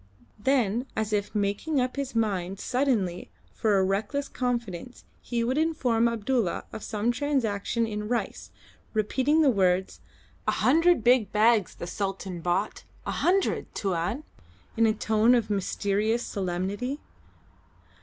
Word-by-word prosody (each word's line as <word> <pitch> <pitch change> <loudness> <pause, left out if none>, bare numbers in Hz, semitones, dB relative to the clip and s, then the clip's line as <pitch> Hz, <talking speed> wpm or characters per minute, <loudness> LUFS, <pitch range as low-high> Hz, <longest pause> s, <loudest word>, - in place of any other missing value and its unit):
Then 245 -1 +1
as 220 -1 -1
if 205 +1 -1
making 205 +9 0
up 255 0 -1
his 275 -3 -4
mind 195 -4 -1
suddenly 235 -10 0 0.2
for 210 -3 +2
a 190 - +3
reckless 205 +9 -1
confidence 240 -3 -4 0.2
he 235 -1 -2
would 255 +5 0
inform 255 -8 +2
Abdulla 230 -3 0
of - - -6
some 215 +3 -1
transaction 235 -4 0
in 210 -1 -4
rice, 240 +1 -3 0.5
repeating 265 +9 +2
the 275 - +5
words, 190 -3 +1 0.5
"A - - +3
hundred 330 -1 +4
big 240 -4 +4
bags 215 -2 +3
the - - -6
Sultan 190 -1 -4
bought; 180 +5 -1 0.2
a - - -2
hundred, 385 +2 +1
Tuan!" 195 - -1 0.5
in 230 0 +4
a 220 - +3
tone 220 +3 +3
of 220 -3 0
mysterious 205 +3 0
solemnity. 200 +8 -3
220 Hz, 135 wpm, -27 LUFS, 200-250 Hz, 0.5 s, the